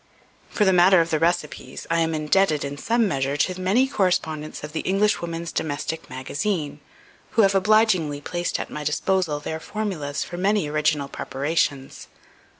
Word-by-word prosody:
For 210 Hz, -, +1 dB
the 190 Hz, -, +4 dB
matter 180 Hz, +1 st, +6 dB
of 165 Hz, 0 st, +1 dB
the 155 Hz, -, +1 dB
recipes, 155 Hz, -5 st, -2 dB
I 165 Hz, -, +3 dB
am 165 Hz, -1 st, +1 dB
indebted, 155 Hz, 0 st, +2 dB
in 140 Hz, 0 st, -5 dB
some 230 Hz, +4 st, +2 dB
measure, 140 Hz, -4 st, -1 dB
to 185 Hz, +5 st, 0 dB
many 215 Hz, +9 st, +3 dB
correspondents 160 Hz, -, -1 dB
of 150 Hz, -, -6 dB
the 160 Hz, -, -3 dB
"Englishwoman's 175 Hz, -4 st, 0 dB
Domestic 160 Hz, +1 st, -3 dB
Magazine," 145 Hz, +3 st, -3 dB, 0.6 s
who 225 Hz, -, +7 dB
have 195 Hz, 0 st, +4 dB
obligingly 195 Hz, -7 st, +3 dB
placed 175 Hz, +4 st, -3 dB
at -, -, -5 dB
my 150 Hz, -, -5 dB
disposal 155 Hz, +1 st, 0 dB
their 160 Hz, +2 st, -5 dB
formulas 160 Hz, -8 st, -3 dB
for 175 Hz, -, -8 dB
many 200 Hz, -2 st, +1 dB
original 150 Hz, -1 st, 0 dB
preparations. 140 Hz, -1 st, -2 dB
165 Hz, 155 wpm, -23 LUFS, 150-190 Hz, 0.6 s, who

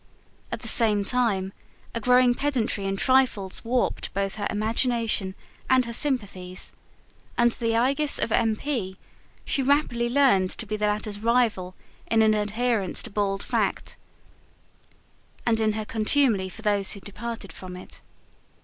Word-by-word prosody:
At -, -, -4 dB
the -, -, -3 dB
same 215 Hz, -5 st, +5 dB
time, 200 Hz, -6 st, 0 dB, 0.4 s
a 230 Hz, -, -2 dB
growing 250 Hz, +1 st, +4 dB
pedantry 245 Hz, -7 st, -1 dB
in 195 Hz, 0 st, -1 dB
trifles 250 Hz, -6 st, +2 dB
warped 245 Hz, +1 st, -1 dB
both 195 Hz, 0 st, -1 dB
her 205 Hz, -, -1 dB
imagination 220 Hz, -2 st, -1 dB, 0.3 s
and 255 Hz, -1 st, +4 dB
her 235 Hz, -, -6 dB
sympathies: 200 Hz, -9 st, -1 dB, 0.6 s
under 235 Hz, 0 st, +3 dB
the 230 Hz, -1 st, -1 dB
aegis 275 Hz, +5 st, +2 dB
of 230 Hz, -, -1 dB
M. 225 Hz, -1 st, +2 dB
P., 215 Hz, -8 st, -4 dB, 0.5 s
she 275 Hz, -, 0 dB
rapidly 255 Hz, -4 st, +1 dB
learned 245 Hz, -8 st, +3 dB
to 225 Hz, -, -3 dB
be 215 Hz, 0 st, -3 dB
the 210 Hz, 0 st, 0 dB
latter's 210 Hz, 0 st, -2 dB
rival 220 Hz, -5 st, +1 dB, 0.3 s
in 225 Hz, -1 st, +3 dB
an 215 Hz, 0 st, +4 dB
adherence 215 Hz, -1 st, 0 dB
to -, -, -8 dB
bald 200 Hz, -1 st, -1 dB
fact, -, -, -1 dB, 1.5 s
and 225 Hz, -2 st, +2 dB
in 215 Hz, -1 st, +1 dB
her 215 Hz, 0 st, -4 dB
contumely 220 Hz, -3 st, +2 dB
for 220 Hz, +4 st, -12 dB
those 205 Hz, -2 st, +1 dB
who 200 Hz, -, -7 dB
departed 225 Hz, +1 st, -7 dB
from 180 Hz, -1 st, -9 dB
it. 180 Hz, -, -10 dB
220 Hz, 150 wpm, -25 LUFS, 200-245 Hz, 1.5 s, same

